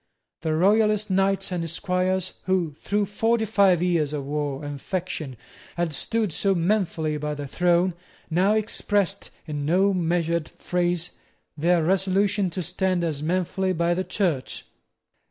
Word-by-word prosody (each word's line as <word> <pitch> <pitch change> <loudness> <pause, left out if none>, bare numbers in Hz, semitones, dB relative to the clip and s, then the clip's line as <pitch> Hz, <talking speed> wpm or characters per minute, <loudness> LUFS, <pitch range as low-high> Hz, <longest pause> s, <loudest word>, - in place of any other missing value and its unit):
The 160 -1 0
royalist 210 +3 +3
knights 195 0 +1
and 175 -2 -1
esquires 185 +2 -1
who, 185 -4 +1
through 205 +8 -1
forty 225 +3 +1
five 195 -5 +3
years 165 -5 +1
of 145 -2 -3
war 145 0 -3
and 145 -1 -6
faction, 170 -8 -4 0.4
had 170 -2 -1
stood 215 +4 0
so 195 +3 +1
manfully 170 -4 0
by 150 0 -3
the 145 -1 -5
throne, 175 +4 +2 0.3
now 185 +5 +2
expressed, 205 -2 0 0.2
in 150 -2 -4
no 190 +6 +3
measured 170 -2 0
phrase, 175 -1 -1 0.4
their 170 +2 +2
resolution 195 +2 +2
to 180 +1 -4
stand 180 +1 0
as 155 -4 -2
manfully 185 +3 0
by 170 0 +1
the 185 +2 -1
Church. 175 -11 -2
180 Hz, 140 wpm, -25 LUFS, 160-195 Hz, 0.4 s, royalist